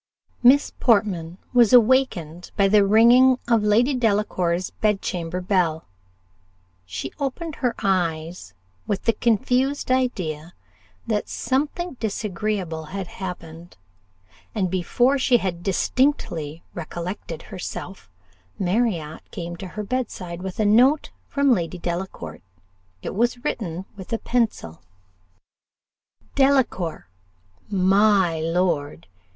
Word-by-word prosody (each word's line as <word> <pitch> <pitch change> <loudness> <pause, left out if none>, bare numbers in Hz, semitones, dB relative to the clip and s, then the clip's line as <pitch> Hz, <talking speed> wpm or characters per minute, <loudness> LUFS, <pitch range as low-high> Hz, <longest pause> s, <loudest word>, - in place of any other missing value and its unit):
Miss 265 +4 +5
Portman 185 -8 +1 0.2
was 240 -2 +5
awakened 215 - +3
by 200 -2 +4
the 205 +1 +5
ringing 240 +5 +6
of 230 -2 +3
Lady 220 +6 +3
Delacour's 200 -7 0
bedchamber 180 -4 -1
bell. 180 -4 0 1.0
She 95 +9 -5
opened 285 +3 -4
her 245 -3 0
eyes 170 - -1 0.3
with 200 - -2
the 230 - +3
confused 250 +6 +1
idea 180 -11 -1 0.5
that 215 -2 -1
something 295 +4 -2
disagreeable 195 -6 -3
had 190 +4 -5 0.2
happened; 170 -2 -7 0.8
and 190 -5 0
before 245 +9 +2
she 255 -1 +4
had 180 -5 -3
distinctly 175 - 0
recollected 170 0 -6
herself, 185 - -7 0.5
Marriott 180 -5 -1
came 170 0 -6
to 190 - -7
her 210 +4 -6
bedside, 200 -7 -4
with 190 +1 -6
a 215 - +2
note 250 +8 +4 0.2
from 280 -2 +3
Lady 175 -3 -2
Delacour: 175 +2 -5 0.6
it - - -4
was 240 +3 0
written 185 -3 -3
with 190 +1 -10
a 230 - +1
pencil. 220 - -1 1.5
"DELACOUR 265 - +1 0.6
my 195 -3 +3
lord!!!! 165 -3 -1
195 Hz, 105 wpm, -23 LUFS, 170-240 Hz, 1.5 s, ringing